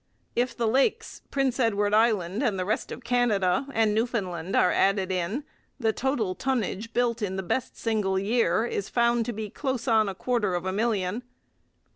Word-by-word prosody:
If 245 Hz, 0 st, 0 dB
the 235 Hz, -, +1 dB
Lakes, 340 Hz, -, +1 dB
Prince 270 Hz, -2 st, 0 dB
Edward 205 Hz, -4 st, +2 dB
Island, 215 Hz, -2 st, +2 dB
the 195 Hz, -9 st, 0 dB
rest 215 Hz, +6 st, -2 dB
of 250 Hz, -, -7 dB
Canada, 235 Hz, -3 st, +1 dB
and 225 Hz, -4 st, +2 dB
Newfoundland 195 Hz, -7 st, -1 dB
are 180 Hz, -, +4 dB
added 195 Hz, -1 st, +2 dB
in, 185 Hz, +10 st, -2 dB, 0.4 s
the 225 Hz, -3 st, +1 dB
total 240 Hz, -8 st, -1 dB
tonnage 230 Hz, -3 st, -2 dB
built 235 Hz, -1 st, 0 dB
in 190 Hz, -2 st, -2 dB
the 190 Hz, -, -3 dB
best 255 Hz, +8 st, -2 dB
single 210 Hz, -4 st, 0 dB
year 215 Hz, 0 st, +2 dB
is 200 Hz, -4 st, -3 dB
found 235 Hz, -1 st, +2 dB
to -, -, -1 dB
be 215 Hz, -2 st, -5 dB
close 265 Hz, -3 st, -3 dB
on 220 Hz, -3 st, +4 dB
a 190 Hz, -, -5 dB
quarter 210 Hz, -4 st, 0 dB
of 175 Hz, +1 st, -3 dB
a 185 Hz, -, 0 dB
million. 210 Hz, -1 st, 0 dB
220 Hz, 175 wpm, -26 LUFS, 195-240 Hz, 0.4 s, are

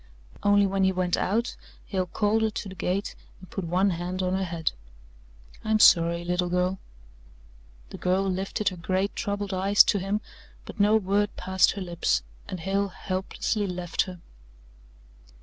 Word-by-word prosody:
Only 205 Hz, 0 st, +4 dB
when 195 Hz, 0 st, 0 dB
he 190 Hz, -, +4 dB
went 180 Hz, -1 st, 0 dB
out, 230 Hz, +5 st, -1 dB, 0.3 s
Hale 185 Hz, -2 st, -2 dB
called 210 Hz, +4 st, +1 dB
her 220 Hz, -, +2 dB
to 210 Hz, -, -5 dB
the -, -, -8 dB
gate 190 Hz, +2 st, -2 dB, 0.3 s
and 185 Hz, -, -15 dB
put 195 Hz, -, -4 dB
one 185 Hz, +4 st, +2 dB
hand 180 Hz, +2 st, -3 dB
on 185 Hz, 0 st, 0 dB
her 190 Hz, 0 st, 0 dB
head. 170 Hz, -2 st, -1 dB, 0.9 s
"I'm 220 Hz, 0 st, +2 dB
sorry, 170 Hz, -4 st, +5 dB
little 180 Hz, 0 st, 0 dB
girl." 180 Hz, +1 st, 0 dB, 1.1 s
The -, -, -8 dB
girl 185 Hz, +2 st, +1 dB
lifted 190 Hz, +3 st, -1 dB
her 185 Hz, -, -9 dB
great 185 Hz, +3 st, -1 dB
troubled 205 Hz, -1 st, -3 dB
eyes 195 Hz, +2 st, +6 dB
to 205 Hz, -, +1 dB
him, 195 Hz, +3 st, -1 dB, 0.4 s
but -, -, -10 dB
no 205 Hz, +2 st, +5 dB
word 205 Hz, 0 st, +1 dB
passed 190 Hz, 0 st, +2 dB
her 200 Hz, -, -6 dB
lips, 175 Hz, -, 0 dB, 0.2 s
and 185 Hz, -, -6 dB
Hale 195 Hz, +3 st, 0 dB
helplessly 190 Hz, +2 st, -2 dB
left 180 Hz, -2 st, -2 dB
her. 180 Hz, -2 st, -9 dB
190 Hz, 165 wpm, -26 LUFS, 180-200 Hz, 1.1 s, eyes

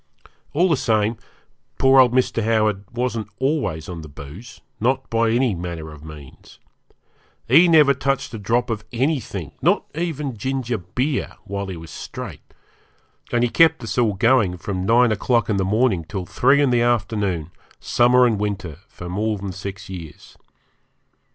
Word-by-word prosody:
All 175 Hz, +5 st, +3 dB
the 165 Hz, -, +3 dB
same, 110 Hz, -2 st, +1 dB, 0.6 s
poor 135 Hz, 0 st, +5 dB
old 125 Hz, -2 st, +6 dB
Mr. 125 Hz, -2 st, +1 dB
Howard 110 Hz, -3 st, +1 dB
wasn't 120 Hz, -3 st, -2 dB
always 130 Hz, -, -1 dB
on 85 Hz, -2 st, -6 dB
the 80 Hz, -, -9 dB
booze, 75 Hz, -, -11 dB, 0.2 s
not 130 Hz, +4 st, 0 dB
by 115 Hz, 0 st, +2 dB
any 120 Hz, 0 st, +2 dB
manner 85 Hz, -3 st, -6 dB
of 75 Hz, -1 st, -13 dB
means. 75 Hz, -4 st, -13 dB, 0.9 s
He 160 Hz, +9 st, +6 dB
never 150 Hz, -4 st, +6 dB
touched 135 Hz, -2 st, -2 dB
a 110 Hz, -, -5 dB
drop 120 Hz, +4 st, 0 dB
of 110 Hz, -1 st, -3 dB
anything, 120 Hz, -, -2 dB
not -, -, +2 dB
even 150 Hz, -5 st, -3 dB
ginger 125 Hz, 0 st, -2 dB
beer, 130 Hz, -, -2 dB
while 100 Hz, 0 st, -4 dB
he 95 Hz, -3 st, -6 dB
was 80 Hz, -1 st, -10 dB
straight, -, -, -8 dB, 0.9 s
and 120 Hz, 0 st, +2 dB
he 120 Hz, -, +2 dB
kept 160 Hz, -6 st, +4 dB
us 110 Hz, -2 st, -4 dB
all 110 Hz, -5 st, +2 dB
going 110 Hz, -4 st, +3 dB
from 95 Hz, 0 st, -4 dB
nine 120 Hz, +1 st, +5 dB
o'clock 115 Hz, +2 st, +1 dB
in 100 Hz, -, +1 dB
the 95 Hz, -, +1 dB
morning 105 Hz, -3 st, +1 dB
till 90 Hz, +3 st, -5 dB
three 135 Hz, +10 st, +3 dB
in 135 Hz, -, +2 dB
the 120 Hz, -1 st, +3 dB
afternoon, 100 Hz, -8 st, 0 dB, 0.3 s
summer 125 Hz, +1 st, +4 dB
and 110 Hz, -4 st, +1 dB
winter, 95 Hz, -6 st, -4 dB
for 90 Hz, -, -10 dB
more 105 Hz, +4 st, -1 dB
than 100 Hz, 0 st, -5 dB
six 95 Hz, +1 st, -7 dB
years. 85 Hz, -5 st, -10 dB
110 Hz, 165 wpm, -21 LUFS, 95-125 Hz, 0.9 s, old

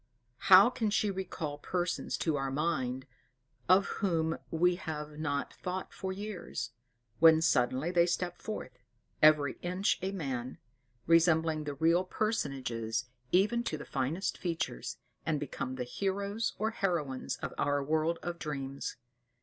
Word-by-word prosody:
How 185 Hz, 0 st, +11 dB
well 240 Hz, -, +3 dB
can 230 Hz, -4 st, 0 dB
she 205 Hz, 0 st, +1 dB
recall 170 Hz, -6 st, -4 dB
persons 175 Hz, +2 st, -2 dB
to 160 Hz, -3 st, 0 dB
our 135 Hz, -1 st, -1 dB
mind, 135 Hz, -3 st, -1 dB, 0.6 s
of 190 Hz, +2 st, +6 dB, 0.2 s
whom 165 Hz, -5 st, +1 dB
we 175 Hz, +2 st, +2 dB
have 150 Hz, -3 st, -6 dB
not 145 Hz, -2 st, -2 dB
thought 185 Hz, +1 st, -5 dB
for 190 Hz, -1 st, -4 dB
years; 190 Hz, -, -5 dB, 0.5 s
when 160 Hz, -1 st, +8 dB
suddenly 130 Hz, +1 st, +2 dB
they 175 Hz, -1 st, +4 dB
step 175 Hz, 0 st, -2 dB
forth 170 Hz, -12 st, -6 dB, 0.4 s
"every 150 Hz, -2 st, +5 dB
inch 180 Hz, +3 st, 0 dB
a 190 Hz, +1 st, -1 dB
man," 130 Hz, -9 st, -4 dB, 0.5 s
resembling 160 Hz, -2 st, +3 dB
the 145 Hz, -1 st, -4 dB
real 165 Hz, +5 st, +3 dB
personages, 135 Hz, -, -2 dB, 0.3 s
even 210 Hz, +6 st, +3 dB
to 155 Hz, -, -2 dB
the 150 Hz, -, -8 dB
finest 145 Hz, +8 st, -2 dB
features, 165 Hz, -8 st, -3 dB, 0.3 s
and 155 Hz, -2 st, 0 dB
become 130 Hz, -2 st, -4 dB
the 125 Hz, -, -3 dB
heroes 200 Hz, -, -2 dB
or 220 Hz, +2 st, 0 dB
heroines 165 Hz, -, -1 dB
of -, -, -6 dB
our 145 Hz, -1 st, +1 dB
world 160 Hz, +3 st, +1 dB
of 175 Hz, 0 st, -4 dB
dreams. 140 Hz, -2 st, -4 dB
160 Hz, 140 wpm, -31 LUFS, 145-185 Hz, 0.6 s, How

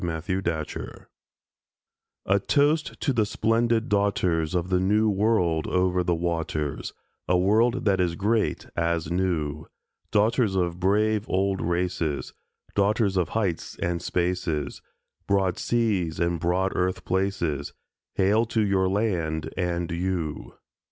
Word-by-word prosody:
TO 90 Hz, -, -2 dB
THE 80 Hz, +2 st, -3 dB
WOMEN 95 Hz, -, 0 dB
OF 95 Hz, -, -5 dB
AUSTRALIA 75 Hz, -, -8 dB, 1.2 s
A 100 Hz, +1 st, +3 dB
toast 150 Hz, +8 st, +1 dB
to 135 Hz, -, +1 dB
the 115 Hz, -3 st, +2 dB
splendid 115 Hz, +2 st, +1 dB
daughters 95 Hz, -, +1 dB
Of 90 Hz, 0 st, -1 dB
the 90 Hz, -, +3 dB
New 105 Hz, +3 st, +3 dB
World 95 Hz, -6 st, +1 dB
over 90 Hz, 0 st, +1 dB
the 85 Hz, -1 st, +1 dB
waters, 80 Hz, -4 st, -2 dB, 0.4 s
A 90 Hz, -, +3 dB
world 115 Hz, +7 st, +2 dB
that 95 Hz, -2 st, +3 dB
is 85 Hz, -2 st, 0 dB
great 105 Hz, +4 st, 0 dB
as 85 Hz, -1 st, -1 dB
new; 80 Hz, -5 st, -1 dB, 0.4 s
Daughters 110 Hz, 0 st, +2 dB
of 90 Hz, -2 st, 0 dB
brave 105 Hz, +3 st, +1 dB
old 95 Hz, 0 st, +1 dB
races, 85 Hz, -3 st, -1 dB, 0.4 s
Daughters 100 Hz, 0 st, +2 dB
of 90 Hz, -4 st, +1 dB
heights 95 Hz, -7 st, -2 dB
and 85 Hz, -1 st, -2 dB
spaces, 85 Hz, -5 st, -2 dB, 0.5 s
Broad 95 Hz, -2 st, +1 dB
seas 105 Hz, -9 st, 0 dB
and 85 Hz, 0 st, 0 dB
broad 90 Hz, +3 st, +1 dB
earth 90 Hz, +1 st, -1 dB
places— 90 Hz, -7 st, -1 dB, 0.4 s
Hail 105 Hz, +4 st, +3 dB
to 115 Hz, -1 st, 0 dB
your 95 Hz, -2 st, +2 dB
land 90 Hz, -7 st, -1 dB
and 85 Hz, -1 st, -2 dB
you! 85 Hz, -3 st, -3 dB
95 Hz, 135 wpm, -25 LUFS, 85-105 Hz, 1.2 s, A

